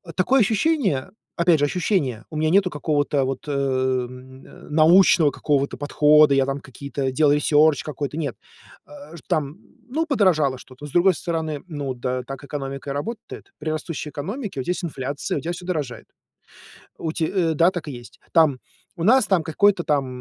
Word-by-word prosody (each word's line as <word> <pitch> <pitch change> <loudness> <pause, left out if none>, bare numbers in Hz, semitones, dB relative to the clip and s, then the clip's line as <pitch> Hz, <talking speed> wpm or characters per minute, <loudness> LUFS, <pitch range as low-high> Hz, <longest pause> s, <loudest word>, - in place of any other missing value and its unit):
Такое 250 +8 +3
ощущение, 210 - +1 0.2
опять 170 -3 +3
же, 145 - +3
ощущение, 145 - -1
у 155 - -9
меня 155 0 +1
нету 190 +1 +3
какого-то 145 -2 0
вот 135 +2 -5
н 130 -1 -3
научного 165 0 +5
какого-то 140 -1 -1
подхода, 150 0 +4
я 135 -1 +3
там 135 +1 -3
какие-то 135 0 -4
делаю 150 +1 +3
research 150 -1 +4
какой-то, 145 0 -5
нет. 155 -3 -3 0.5
Э, 285 -10 -12
там, 155 -2 -1 0.3
ну, 320 +5 -1
подорожало 175 - +2
что-то, 130 +3 -13
с 150 - -9
другой 180 +2 +4
стороны, 160 -3 -3
ну 145 -5 -4
да, 125 0 -3
так 135 +2 -8
экономика 135 -1 -6
и - - -2
работает. 220 +10 -7
При 155 - -4
растущей 155 -1 -4
экономике 195 - -5
у - - -2
тебя 175 - -1
есть 180 - -4
инфляция, 140 -3 -3
у - - -3
тебя 170 +2 -3
всё 175 +1 -9
дорожает. 150 -9 -4 0.9
У 160 -1 -3
те, 160 - -1
э, 165 -3 0
да, 170 +4 +4
так 175 -4 -6
и - - -5
есть. 120 -2 -12
Там 155 -6 +4 0.4
у 165 - -3
нас 245 +2 +5
там, 190 -4 +2
какой-то 185 +2 +2
там 140 -3 +1
150 Hz, 175 wpm, -22 LUFS, 140-175 Hz, 0.9 s, научного